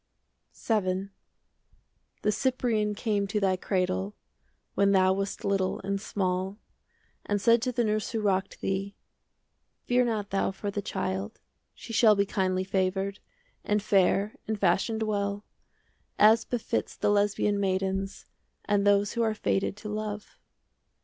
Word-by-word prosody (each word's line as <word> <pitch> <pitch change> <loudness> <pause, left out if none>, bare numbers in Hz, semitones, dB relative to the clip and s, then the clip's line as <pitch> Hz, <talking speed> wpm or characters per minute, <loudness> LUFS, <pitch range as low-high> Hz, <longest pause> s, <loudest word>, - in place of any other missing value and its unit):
30 205 -5 0
VII 190 +2 -5 1.1
The 210 - +3
Cyprian 225 -3 0
came 205 -2 0
to 210 +2 -1
thy 190 -2 +2
cradle, 180 - -1 0.6
When 200 0 +3
thou 185 -1 +4
wast 195 +1 -3
little 195 -2 0
and 195 0 -2
small, 190 -1 -2 0.7
And 205 0 +1
said 230 +3 +4
to 255 +1 0
the 240 0 0
nurse 215 -1 0
who 225 - -2
rocked 195 -2 -1
thee 195 +1 -2 0.9
"Fear 250 0 +3
not 215 -4 -2
thou 195 - +1
for 195 +1 -4
the 205 - -3
child: 190 +2 -3 0.4
"She 230 - -9
shall 220 -1 +6
be 200 0 +2
kindly 185 -2 0
favoured, 190 +1 -1 0.4
5 - - -30
And 210 -1 +1
fair 200 +1 +2
and 220 -1 -2
fashioned 200 +4 +1
well, 205 -1 -2 0.7
As 220 +2 +6
befits 245 -3 -2
the - - +2
Lesbian 205 0 +2
maidens 195 0 -1 0.4
And 205 -1 +2
those 205 0 +3
who 235 - -1
are 220 -1 +1
fated 195 -1 -1
to 210 - -7
love." 210 -1 -5
200 Hz, 145 wpm, -28 LUFS, 195-215 Hz, 1.1 s, shall